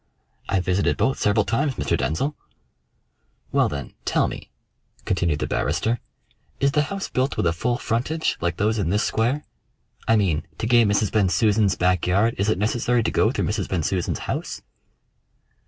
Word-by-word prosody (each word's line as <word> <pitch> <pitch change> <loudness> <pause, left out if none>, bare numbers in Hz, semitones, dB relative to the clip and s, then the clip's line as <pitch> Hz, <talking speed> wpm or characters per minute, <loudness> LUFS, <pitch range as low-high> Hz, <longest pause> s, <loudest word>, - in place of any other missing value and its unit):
"I've 95 -2 +1
visited 95 +2 +1
both 135 - +1
several 105 +1 +2
times, 135 +3 0
Mr. - - 0
Denzil." 135 - -1 1.2
"Well, - - +3
then, 70 -2 -6
tell - - +2
me," - - -8 0.6
continued 85 -5 +1
the - - -2
barrister, 115 +2 0 0.6
"is 140 0 +3
the 150 - +2
house 195 -1 -3
built 130 +2 -1
with - - +1
a 85 - +2
full 120 +8 -1
frontage 135 +10 -1
like 85 0 -1
those 110 +2 +1
in 95 - 0
this 105 +4 +1
square? 125 +7 0 0.6
I 115 - +5
mean, 90 -9 +1
to - - -3
gain 120 -2 +4
Mrs. 105 0 +1
Bensusan's 100 0 +2
back 90 0 +1
yard 100 +6 +3
is 100 +2 +1
it 110 - +2
necessary 115 +3 +1
to - - 0
go 110 - +3
through - - -1
Mrs. 105 -1 -2
Bensusan's 90 0 -1
house?" - - -4
105 Hz, 170 wpm, -23 LUFS, 90-120 Hz, 1.2 s, I